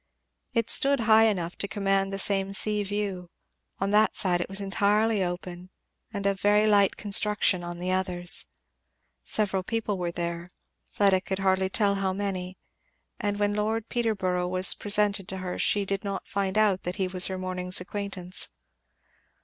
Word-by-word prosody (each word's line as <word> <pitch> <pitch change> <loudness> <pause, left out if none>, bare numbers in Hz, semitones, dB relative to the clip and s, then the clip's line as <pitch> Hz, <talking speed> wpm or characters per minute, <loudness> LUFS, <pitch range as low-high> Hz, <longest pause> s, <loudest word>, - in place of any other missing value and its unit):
It 230 -1 +1
stood 275 -2 +5
high 220 0 +5
enough 180 -5 -1
to 200 - -2
command 195 -1 0
the 195 - -3
same 195 0 +1
sea 210 +1 +2
view. 200 -3 -4 0.5
On 195 +1 -2
that 215 +1 +3
side 175 -2 +1
it - - -5
was 195 +1 -5
entirely 205 +1 +1
open, 180 0 -6 0.4
and 200 -3 -5
of 195 -1 0
very 210 +1 +3
light 205 -2 +3
construction 205 -2 +3
on 175 0 -6
the 180 +1 -3
others. 180 -2 -1 0.8
Several 195 -3 -1
people 210 0 -3
were 175 -1 -2
there; 170 0 -5 0.4
Fleda 195 -2 +1
could 190 0 -4
hardly 190 -1 +1
tell 200 0 +2
how 190 -1 0
many; 185 -2 -4 0.6
and 205 -2 -2
when 205 0 0
Lord 215 +2 -2
Peterborough 190 -7 -1
was 185 +1 +4
presented 205 -2 +1
to 190 - -3
her 185 -1 -5
she 205 -1 +1
did 195 0 -3
not 200 -1 -5
find 195 0 -2
out 205 -3 +2
that 180 +1 -4
he 190 -2 -1
was 185 -1 +2
her 190 - -4
morning's 185 0 0
acquaintance. 190 -1 -3
195 Hz, 165 wpm, -26 LUFS, 185-205 Hz, 0.8 s, stood